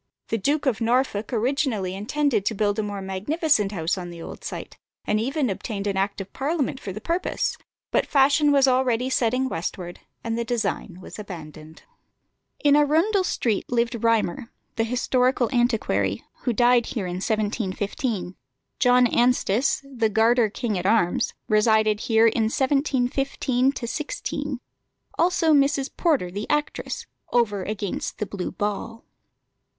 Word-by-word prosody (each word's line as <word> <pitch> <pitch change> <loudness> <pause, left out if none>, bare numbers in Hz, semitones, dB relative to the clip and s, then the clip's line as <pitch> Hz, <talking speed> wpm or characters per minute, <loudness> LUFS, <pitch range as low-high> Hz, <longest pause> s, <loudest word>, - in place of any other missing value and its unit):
The 225 - 0
Duke 290 +8 0
of 250 -4 0
Norfolk 230 -2 +1
originally 235 -5 0
intended 225 +3 0
to 220 - 0
build 205 +1 0
a - - +3
more 205 -2 -4
magnificent 210 - 0
house 175 -1 -1
on 175 -1 -6
the 170 -1 -9
old - - -9
site, - - -6 0.3
and 210 - +1
even 270 +4 0
obtained 200 0 -4
an 200 -1 -1
act 195 +1 -1
of 195 0 -8
Parliament 280 -2 -1
for 195 - -6
the 190 - -6
purpose; 340 - -1 0.4
but - - +1
fashion 285 +1 +4
was 275 -1 +5
already 255 -1 +2
setting 255 +2 +1
westward, 175 -3 -5 0.2
and 230 0 -2
the - - 0
design 220 -6 -2
was 185 - -10
abandoned. 160 -5 -10 0.8
In 290 -1 +5
Arundel 325 +8 +3
Street 230 - -1
lived 235 -1 0
Rymer, 230 -1 +1 0.3
the 225 - +1
historical 250 +1 +1
antiquary, 215 - +1 0.2
who 245 - +2
died 240 0 +3
here 215 -6 -3
in 180 0 -4
1715; 205 -1 -2 0.4
John 250 0 +5
Anstis, 245 +1 +2
the 235 -5 0
Garter 225 +1 +3
king 210 -2 -2
at 180 - -2
arms, 205 -5 +2
resided 215 0 +3
here 225 0 +3
in 225 0 +3
1715 265 0 +1
16; 285 +2 -4 0.6
also 335 -2 +3
Mrs. 280 -1 +2
Porter, 285 - +1
the 205 +3 -5
actress, 295 0 -2 0.3
"over 210 -5 +2
against 200 0 -4
the 210 - -2
Blue 195 -3 -5
Ball." 210 +3 -4
230 Hz, 145 wpm, -24 LUFS, 205-265 Hz, 0.8 s, was